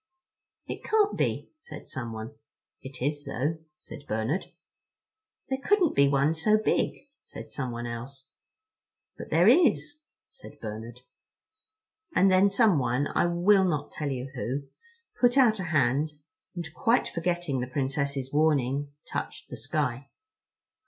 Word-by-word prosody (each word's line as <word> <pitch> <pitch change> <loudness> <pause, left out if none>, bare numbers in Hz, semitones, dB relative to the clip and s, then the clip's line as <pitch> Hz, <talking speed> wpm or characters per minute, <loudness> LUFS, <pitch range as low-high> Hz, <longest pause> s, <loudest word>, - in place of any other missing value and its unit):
"It - - -6
can't 430 -2 +2
be," - - -1
said - - -11
someone. 115 0 -6 0.5
"It 130 -1 -7
is 145 +1 -1
though," 150 +7 -2 0.2
said 145 - -12
Bernard. 110 - -1 1.0
"There 265 0 -2
couldn't 395 -6 +3
be 140 0 +5
one 140 +2 +2
so 210 +7 +3
big," 220 +5 -1 0.2
said - - -10
someone 120 -3 -4
else. 125 +3 -7 0.9
"But - - -9
there 170 +4 +4
is," 300 +2 +4 0.3
said - - -14
Bernard. 115 +2 -7 1.1
And 190 +1 +5
then 190 +2 +5
someone—I 150 - +2
will 185 +3 +4
not 150 -5 -1
tell 150 -2 -3
you 130 0 -4
who—put 245 - -2
out 230 -6 +5
a 185 - -3
hand, 150 -1 +1 0.4
and, 175 -2 -4
quite 240 -1 +2
forgetting 175 -5 -1
the 125 - -2
Princess's 140 0 -2
warning, 145 -2 +1
touched - - -6
the - - -4
sky. 135 0 -2
145 Hz, 125 wpm, -28 LUFS, 130-190 Hz, 1.1 s, be